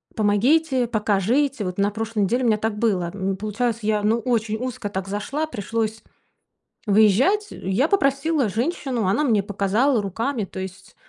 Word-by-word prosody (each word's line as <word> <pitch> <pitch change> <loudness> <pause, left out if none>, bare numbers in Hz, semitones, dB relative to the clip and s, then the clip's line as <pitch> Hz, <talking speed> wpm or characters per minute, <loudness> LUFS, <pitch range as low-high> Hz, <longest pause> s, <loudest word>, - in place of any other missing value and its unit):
помогите, 250 +5 +2
покажите". 220 +5 +1
Вот 180 0 -4
на 200 +1 +2
прошлой 220 0 -2
неделе 240 +7 +1
у - - +2
меня 215 -2 +3
так 215 0 -2
было. 195 -6 0
М, 195 -1 -2
получается, 220 +2 -2
я 210 -1 +2
ну 225 +2 +2
очень 225 -2 -1
узко 250 -2 -4
так 190 -1 -4
зашла, 265 +10 -3
пришлось 220 -2 -3 0.8
выезжать. 220 - +4
Я 195 +11 0
попросила 280 - +2
женщину, 245 - -1
она 200 +11 +2
мне 220 -8 +2
показала 210 +6 +1
руками. 225 +4 -2
То 190 - -9
есть 190 +3 -8
220 Hz, 155 wpm, -23 LUFS, 205-255 Hz, 0.8 s, выезжать